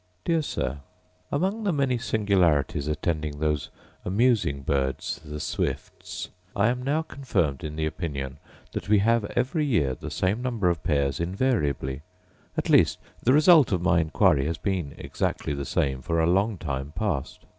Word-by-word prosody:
Dear 165 Hz, -1 st, +2 dB
Sir, 70 Hz, -, -3 dB, 0.5 s
Among 190 Hz, +9 st, 0 dB
the 200 Hz, -, +2 dB
many 135 Hz, -5 st, +1 dB
singularities 90 Hz, -11 st, +1 dB
attending 75 Hz, -1 st, -2 dB
those 75 Hz, -1 st, -1 dB, 0.3 s
amusing 100 Hz, -, +2 dB
birds 65 Hz, 0 st, -1 dB
the 75 Hz, -1 st, -6 dB
swifts, -, -, -4 dB, 0.3 s
I 100 Hz, +3 st, +3 dB
am 125 Hz, +1 st, -1 dB
now 145 Hz, +5 st, 0 dB
confirmed 100 Hz, -, -1 dB
in 75 Hz, -1 st, -5 dB
the 80 Hz, 0 st, -1 dB
opinion 70 Hz, -4 st, -4 dB, 0.3 s
that -, -, -5 dB
we 105 Hz, -, +6 dB
have 115 Hz, +2 st, +3 dB
every 135 Hz, +6 st, +1 dB
year 95 Hz, -, +2 dB
the -, -, -7 dB
same 100 Hz, +6 st, 0 dB
number 115 Hz, -8 st, +1 dB
of 85 Hz, -, -4 dB
pairs 70 Hz, -3 st, +1 dB
invariably; 85 Hz, -, 0 dB, 0.6 s
at -, -, -1 dB
least -, -, +5 dB, 0.2 s
the 130 Hz, -, +3 dB
result 155 Hz, -, +6 dB
of 90 Hz, -3 st, 0 dB
my 85 Hz, -1 st, +4 dB
inquiry 80 Hz, -3 st, +3 dB
has 80 Hz, 0 st, -2 dB
been 90 Hz, -8 st, -2 dB
exactly 70 Hz, -, -2 dB
the 70 Hz, -1 st, -4 dB
same 65 Hz, -2 st, 0 dB
for 85 Hz, +5 st, -1 dB
a 80 Hz, -, +3 dB
long 100 Hz, +5 st, +2 dB
time 70 Hz, -2 st, -4 dB
past. 80 Hz, -9 st, -3 dB
85 Hz, 160 wpm, -26 LUFS, 75-115 Hz, 0.6 s, we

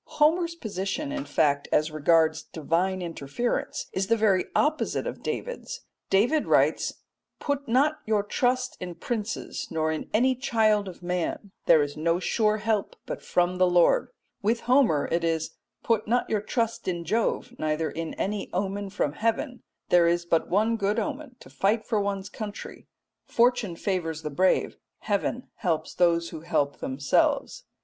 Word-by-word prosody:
Homer's 335 Hz, +3 st, +3 dB
position, 220 Hz, -, -3 dB
in 290 Hz, -1 st, -3 dB
fact, 145 Hz, -2 st, +1 dB
as 155 Hz, +1 st, +2 dB
regards 160 Hz, +1 st, +3 dB
divine 180 Hz, +4 st, -1 dB
interference 165 Hz, -, -3 dB
is 190 Hz, 0 st, -1 dB
the 230 Hz, +2 st, +3 dB
very 200 Hz, -4 st, +3 dB
opposite 305 Hz, +1 st, +1 dB
of -, -, -5 dB
David's. -, -, -5 dB, 0.3 s
David 245 Hz, +11 st, +3 dB
writes, -, -, +2 dB, 0.4 s
"Put 285 Hz, -1 st, -2 dB
not 285 Hz, +6 st, +2 dB
your 215 Hz, -2 st, +2 dB
trust 250 Hz, +4 st, 0 dB
in 180 Hz, -1 st, -6 dB
princes 225 Hz, +1 st, -4 dB
nor 160 Hz, -1 st, 0 dB
in 155 Hz, -, -4 dB
any 255 Hz, +5 st, +3 dB
child 220 Hz, -5 st, +2 dB
of 180 Hz, -1 st, -10 dB
man; 180 Hz, +3 st, -2 dB, 0.2 s
there 160 Hz, -3 st, +6 dB
is 145 Hz, 0 st, -5 dB
no 165 Hz, +2 st, +1 dB
sure 215 Hz, +3 st, +1 dB
help 215 Hz, -1 st, -1 dB
but -, -, -5 dB
from 180 Hz, +1 st, 0 dB
the 185 Hz, -, +5 dB
Lord." 175 Hz, -, +4 dB, 0.3 s
With 225 Hz, +3 st, +1 dB
Homer 245 Hz, -, +3 dB
it 170 Hz, +1 st, +1 dB
is, 165 Hz, -1 st, 0 dB, 0.3 s
"Put 225 Hz, -2 st, +1 dB
not 245 Hz, +3 st, +1 dB
your 215 Hz, -2 st, 0 dB
trust 230 Hz, +1 st, -2 dB
in 175 Hz, -2 st, -2 dB
Jove 230 Hz, +5 st, 0 dB
neither 155 Hz, +1 st, -1 dB
in 165 Hz, -1 st, -5 dB
any 200 Hz, 0 st, -2 dB
omen 195 Hz, +2 st, -2 dB
from 170 Hz, -7 st, -1 dB
heaven; 230 Hz, -, -1 dB, 0.3 s
there 175 Hz, -1 st, +5 dB
is 170 Hz, 0 st, +1 dB
but 165 Hz, -1 st, +1 dB
one 220 Hz, +4 st, +2 dB
good 205 Hz, +1 st, 0 dB
omen 280 Hz, +1 st, -3 dB
to -, -, -13 dB
fight 200 Hz, -, +1 dB
for 215 Hz, -3 st, +1 dB
one's 200 Hz, -1 st, -2 dB
country. 210 Hz, -2 st, -8 dB, 0.4 s
Fortune 240 Hz, -6 st, +2 dB
favours 165 Hz, -4 st, -2 dB
the 150 Hz, -, -4 dB
brave; 185 Hz, +6 st, +2 dB, 0.2 s
heaven 215 Hz, +4 st, -1 dB
helps 165 Hz, -7 st, -1 dB
those 170 Hz, -1 st, +2 dB
who 160 Hz, -, -7 dB
help 145 Hz, -4 st, 0 dB
themselves." 135 Hz, +2 st, 0 dB
200 Hz, 160 wpm, -26 LUFS, 170-230 Hz, 0.4 s, there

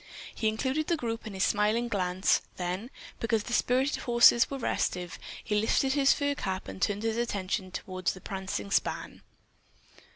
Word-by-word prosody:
He 220 Hz, -, -1 dB
included 260 Hz, +8 st, 0 dB
the 340 Hz, -, +1 dB
group 230 Hz, -4 st, -4 dB
in 205 Hz, -, -7 dB
his 190 Hz, -, +1 dB
smiling 215 Hz, +3 st, +2 dB
glance, 185 Hz, -3 st, +1 dB, 0.2 s
then, 185 Hz, +6 st, -3 dB, 0.3 s
because 225 Hz, -2 st, 0 dB
the 240 Hz, -, -5 dB
spirited 260 Hz, +4 st, +2 dB
horses 235 Hz, -1 st, +5 dB
were 275 Hz, -, -4 dB
restive, 180 Hz, -8 st, -2 dB, 0.2 s
he -, -, -3 dB
lifted 265 Hz, +4 st, +2 dB
his 275 Hz, -1 st, +4 dB
fur 285 Hz, 0 st, +1 dB
cap 190 Hz, -8 st, -4 dB
and 95 Hz, 0 st, -8 dB
turned 205 Hz, +1 st, 0 dB
his 225 Hz, 0 st, 0 dB
attention 200 Hz, -4 st, -2 dB
toward 185 Hz, 0 st, -7 dB
the 185 Hz, -, +1 dB
prancing 190 Hz, -, -4 dB
span. -, -, -1 dB
220 Hz, 165 wpm, -29 LUFS, 190-240 Hz, 0.3 s, horses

